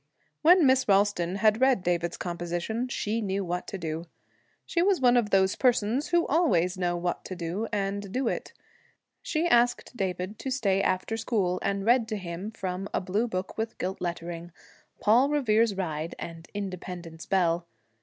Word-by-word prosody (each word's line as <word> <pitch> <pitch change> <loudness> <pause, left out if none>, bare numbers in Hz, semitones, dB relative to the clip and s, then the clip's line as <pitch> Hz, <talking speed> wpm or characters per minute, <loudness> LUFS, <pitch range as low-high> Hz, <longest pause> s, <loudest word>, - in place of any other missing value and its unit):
When 345 +1 +6
Miss 260 0 +4
Ralston 195 -3 +2
had 215 +3 +3
read 260 -7 +4
David's 175 -1 0
composition, 175 +7 -3
she 225 -2 -2
knew 195 -1 -1
what 180 +1 -3
to 195 - -5
do. 165 -1 -4 0.6
She 340 - 0
was 385 -1 +3
one 250 -2 +5
of 235 -4 +2
those 190 -1 +3
persons 245 +2 +2
who 345 -1 +2
always 190 - +2
know 175 -1 -1
what 175 0 -2
to 185 - -5
do, 180 +6 -3
and 200 -1 -2
do 255 +3 -1
it. - - -3 0.7
She 320 +1 -1
asked 245 -4 +2
David 190 -1 -3
to 270 - -4
stay 200 -7 +1
after 185 +4 0
school, 200 -6 0
and 195 0 -1
read 235 0 +4
to 215 -1 -3
him, 180 +2 -5
from 190 -3 -4
a - - 0
blue 200 +6 -1
book 185 -1 -4
with 225 0 -3
gilt 190 +1 -4
lettering, 170 -1 -4 0.5
'Paul 240 +6 +4
Revere's 230 -7 +2
Ride' 165 -3 -3
and 165 -1 -8
'Independence 180 -4 -6
Bell.' 170 -2 +1
195 Hz, 170 wpm, -27 LUFS, 180-230 Hz, 0.7 s, When